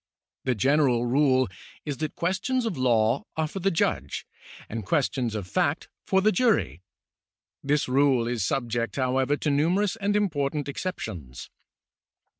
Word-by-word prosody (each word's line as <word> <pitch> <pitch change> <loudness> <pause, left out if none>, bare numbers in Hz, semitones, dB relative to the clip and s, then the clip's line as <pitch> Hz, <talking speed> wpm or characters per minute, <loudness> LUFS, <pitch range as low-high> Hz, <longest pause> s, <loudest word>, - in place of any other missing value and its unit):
The 130 -1 +1
general 130 +1 +3
rule 130 0 +3 0.4
is 145 -3 -3
that 155 +3 -4
questions 210 +9 0
of 220 -6 -2
law 120 -2 +2
are 160 -1 +1
for 195 - -6
the 195 +2 +2
judge 70 - -1 0.4
and 110 0 -5
questions 125 0 0
of 105 -4 -3
fact - - 0 0.2
for 190 - +3
the 215 - +5
jury. 210 - +1 0.8
This 145 +1 +1
rule 130 -2 +3
is 120 -4 -1
subject, 115 -1 -1
however, 130 +2 +1
to 150 - -1
numerous 175 +8 +2
and 205 -1 0
important 150 -8 0
exceptions. 100 - -6
140 Hz, 140 wpm, -26 LUFS, 120-165 Hz, 0.8 s, the